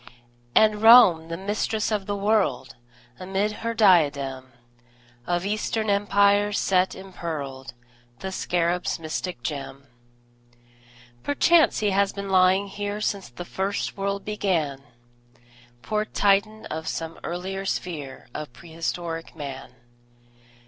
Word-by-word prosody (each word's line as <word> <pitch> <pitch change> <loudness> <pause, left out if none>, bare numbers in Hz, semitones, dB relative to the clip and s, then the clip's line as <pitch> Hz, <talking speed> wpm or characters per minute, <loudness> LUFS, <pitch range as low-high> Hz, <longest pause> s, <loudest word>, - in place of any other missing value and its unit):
And 215 -1 +4
Rome, 220 -8 +8
the 165 0 -5
Mistress 210 +3 -2
of 205 -3 -1
the 205 - -1
World, 195 - 0 0.4
Amid 195 +3 -1
her 230 0 -2
diadem 145 - +3 0.8
Of 175 +1 0
Eastern 215 +1 -1
Empires 205 0 +3
set 185 -1 +2
impearled 155 -9 -6 0.4
The 190 +6 -6
Scarab's 175 -1 -1
mystic 160 -3 -5
gem. 140 -1 -5 1.4
Perchance 305 -3 +3
he 210 -2 +2
has 200 0 +2
been 200 -1 -5
lying 185 +1 +4
here 205 +1 -4
Since 200 - -2
first 190 +9 -3
the 195 - -9
world 200 0 -2
began, 170 -10 -1 1.0
Poor 215 0 -1
Titan 210 +1 +1
of 160 +1 -5
some 165 0 -4
earlier 190 +3 -4
sphere 155 -10 -5
Of 150 -4 -6
prehistoric 165 +3 -5
Man! 140 -4 -8
190 Hz, 115 wpm, -25 LUFS, 165-205 Hz, 1.4 s, Rome